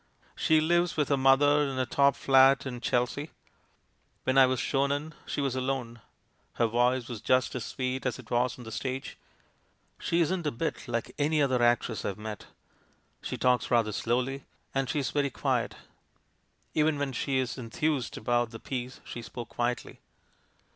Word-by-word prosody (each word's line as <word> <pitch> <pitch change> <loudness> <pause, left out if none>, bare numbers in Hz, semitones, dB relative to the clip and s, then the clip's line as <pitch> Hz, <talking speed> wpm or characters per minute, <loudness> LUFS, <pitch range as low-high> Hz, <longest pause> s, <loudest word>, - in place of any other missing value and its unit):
"She 160 -1 +3
lives 175 +2 +2
with 150 -3 +1
her 140 - +4
mother 140 +2 +5
in 135 -2 -1
a 130 - +1
top 140 +3 +3
flat 135 0 +5
in 125 -2 -5
Chel 125 -1 +2
sea. 145 +5 -6 0.9
When 130 - +1
I 135 -1 +7
was 130 0 0
shown 140 0 +1
in, 150 +2 -3
she - - -2
was 135 -2 -1
alone. 130 -3 -3 0.5
Her 115 - +2
voice 120 +2 +1
was 115 -5 -6
just 130 +2 +2
as 125 -3 -4
sweet 130 0 -2
as 125 - -2
it 130 -3 -13
was 125 +1 +1
on 125 - -10
the 110 - -8
stage. 130 +3 -4 0.8
She 170 - 0
isn't 170 0 0
a - - +1
bit 155 +5 -3
like 115 -1 -3
anv 150 +1 +2
other 130 -3 +1
actress 120 -1 +2
I've 100 - -3
met; 105 -1 -7 0.7
she - - -4
talks 125 -1 +2
rather 115 -3 +3
slowly, 125 +5 -1 0.3
and 135 -1 0
she's 145 -2 -1
very 145 -1 +1
quiet. - - -1 1.0
Even 155 -1 +2
when 140 -2 -2
she 130 +2 0
enthused 130 +2 -2
about 120 +1 +1
the 115 0 -9
piece 125 -1 -5
she 120 - -7
spoke 120 0 -8
quietly. 120 0 -3
130 Hz, 175 wpm, -29 LUFS, 120-140 Hz, 1.0 s, I